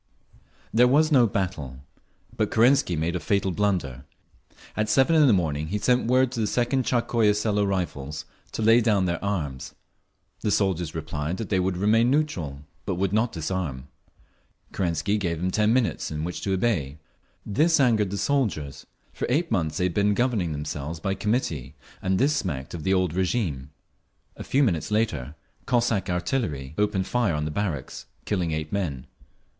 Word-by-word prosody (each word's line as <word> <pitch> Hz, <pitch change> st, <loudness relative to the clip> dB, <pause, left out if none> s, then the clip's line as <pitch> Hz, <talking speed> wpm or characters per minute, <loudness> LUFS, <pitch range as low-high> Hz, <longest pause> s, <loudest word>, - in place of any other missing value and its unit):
There 120 Hz, +3 st, +6 dB
was 155 Hz, +5 st, +3 dB
no 125 Hz, -5 st, +6 dB
battle. 75 Hz, -, -3 dB, 0.5 s
But -, -, 0 dB
Kerensky 120 Hz, -, +3 dB
made 80 Hz, +3 st, -1 dB
a -, -, -1 dB
fatal 100 Hz, +1 st, 0 dB
blunder. 90 Hz, -10 st, -1 dB, 0.7 s
At 110 Hz, 0 st, 0 dB
seven 135 Hz, +7 st, +4 dB
in 155 Hz, -2 st, +6 dB
the -, -, +6 dB
morning 80 Hz, -6 st, 0 dB
he 105 Hz, -, -2 dB
sent 125 Hz, +3 st, +2 dB
word 130 Hz, +1 st, +3 dB
to 125 Hz, -, -4 dB
the 110 Hz, -, +1 dB
Second 125 Hz, +3 st, 0 dB
Tsarskoye 115 Hz, -4 st, +2 dB
Selo 105 Hz, -1 st, +1 dB
Rifles 80 Hz, -7 st, -3 dB, 0.3 s
to 110 Hz, -, -2 dB
lay 115 Hz, +2 st, +6 dB
down 105 Hz, -5 st, +2 dB
their 85 Hz, 0 st, -2 dB
arms. 80 Hz, -10 st, -3 dB, 0.6 s
The -, -, -1 dB
soldiers 90 Hz, -5 st, 0 dB
replied 80 Hz, +1 st, -3 dB
that 110 Hz, -, -5 dB
they 95 Hz, -, +2 dB
would 90 Hz, 0 st, 0 dB
remain 110 Hz, +5 st, +3 dB
neutral, 90 Hz, -, -1 dB, 0.2 s
but -, -, -2 dB
would 95 Hz, +2 st, -1 dB
not 110 Hz, +2 st, +2 dB
disarm. 75 Hz, -5 st, -4 dB, 0.8 s
Kerensky 90 Hz, +3 st, 0 dB
gave 85 Hz, -4 st, -1 dB
them 90 Hz, +2 st, -1 dB
ten 105 Hz, +2 st, +2 dB
minutes 125 Hz, -2 st, 0 dB
in 75 Hz, 0 st, -4 dB
which 90 Hz, +2 st, -4 dB
to 95 Hz, -, -1 dB
obey. 90 Hz, -, 0 dB, 0.5 s
This 155 Hz, +10 st, +2 dB
angered 110 Hz, -7 st, +3 dB
the 100 Hz, -, -3 dB
soldiers; 80 Hz, -, -1 dB, 0.3 s
for -, -, -3 dB
eight 160 Hz, +7 st, +1 dB
months 80 Hz, -4 st, 0 dB
they 90 Hz, -, +1 dB
had 90 Hz, -, -1 dB
been 100 Hz, +1 st, +2 dB
governing 115 Hz, -9 st, 0 dB
themselves 75 Hz, +1 st, -4 dB
by 95 Hz, +4 st, -1 dB
committee, 100 Hz, -, -2 dB, 0.3 s
and 95 Hz, 0 st, +1 dB
this 145 Hz, +6 st, +2 dB
smacked 75 Hz, -, -3 dB
of 85 Hz, -, -5 dB
the 95 Hz, -, 0 dB
old 90 Hz, -3 st, +1 dB
régime…. 90 Hz, -, -1 dB, 0.7 s
A -, -, -7 dB
few 140 Hz, +2 st, +2 dB
minutes 85 Hz, -, 0 dB
later 105 Hz, -, -1 dB, 0.3 s
Cossack 115 Hz, -6 st, +1 dB
artillery 90 Hz, -, -2 dB
opened 105 Hz, -2 st, +1 dB
fire 120 Hz, -9 st, +1 dB
on 75 Hz, 0 st, -2 dB
the 75 Hz, -, -3 dB
barracks, 80 Hz, -6 st, -4 dB, 0.2 s
killing 90 Hz, -5 st, -1 dB
eight 75 Hz, 0 st, -3 dB
men. 80 Hz, -11 st, -2 dB
95 Hz, 170 wpm, -25 LUFS, 80-115 Hz, 0.8 s, There